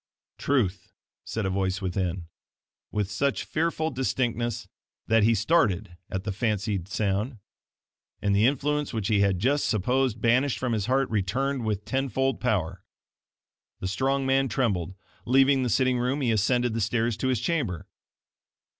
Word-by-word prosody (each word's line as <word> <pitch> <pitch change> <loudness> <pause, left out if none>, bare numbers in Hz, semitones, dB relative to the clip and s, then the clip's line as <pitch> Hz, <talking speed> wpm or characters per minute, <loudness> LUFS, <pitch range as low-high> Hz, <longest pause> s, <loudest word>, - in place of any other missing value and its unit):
"TRUTH," 100 -10 0 0.3
said 110 -2 -3
a 95 - 0
voice 95 0 -1
within, 90 -2 -2 0.7
with 105 -1 -2
such 140 +7 0
fearful 160 0 -1
distinctness 120 -4 -1 0.4
that 115 0 +3
he 115 +2 +4
started 105 - +1
at 95 0 -3
the 105 - -2
fancied 105 -3 -1
sound; 105 +4 -1 0.8
and 100 -1 +1
the 105 +4 +5
influence 145 +1 0
which 110 -1 -1
he 105 -2 +3
had 100 -2 +3
just 135 +9 +1
supposed 125 +3 +1
banished 125 +4 +2
from 125 -2 -1
his 105 -2 -1
heart 135 +1 +2
returned 125 +6 -1
with 105 -2 -2
ten 135 0 -1
fold 135 +1 0
power. 95 -7 -1 1.0
The 95 - -3
strong 135 +8 0
man 135 0 +2
trembled. 95 -9 -1 0.3
Leaving 135 +2 +4
the 125 - 0
sitting 130 +2 +2
room, 130 +4 0
he 120 -3 +2
ascended 120 +2 +1
the 115 - -1
stairs 115 +2 0
to 130 - -1
his 130 -4 +1
chamber. 115 - -2
115 Hz, 155 wpm, -26 LUFS, 100-130 Hz, 1.0 s, the